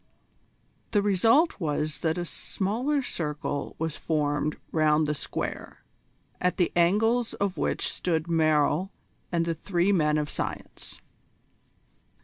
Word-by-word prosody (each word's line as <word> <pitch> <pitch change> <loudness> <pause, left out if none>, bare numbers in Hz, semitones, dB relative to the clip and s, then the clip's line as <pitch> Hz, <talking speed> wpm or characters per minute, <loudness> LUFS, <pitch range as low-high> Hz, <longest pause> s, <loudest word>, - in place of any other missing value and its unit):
The 205 -2 +3
result 225 - +3
was 155 -2 -1
that 160 0 0
a 175 - -2
smaller 245 - -1
circle 150 - -3
was 160 -2 -2
formed 150 -1 0
round 155 -1 +3
the 150 - 0
square, 145 - -5 0.6
at 180 0 +1
the 175 - +2
angles 225 +7 +2
of 200 -2 -1
which - - -1
stood 165 -2 -1
Merrill 155 +2 +2 0.4
and 170 -1 +1
the 170 - 0
three 175 +3 0
men 155 -5 +3
of 150 -1 0
science. - - -6
170 Hz, 125 wpm, -27 LUFS, 150-200 Hz, 0.6 s, The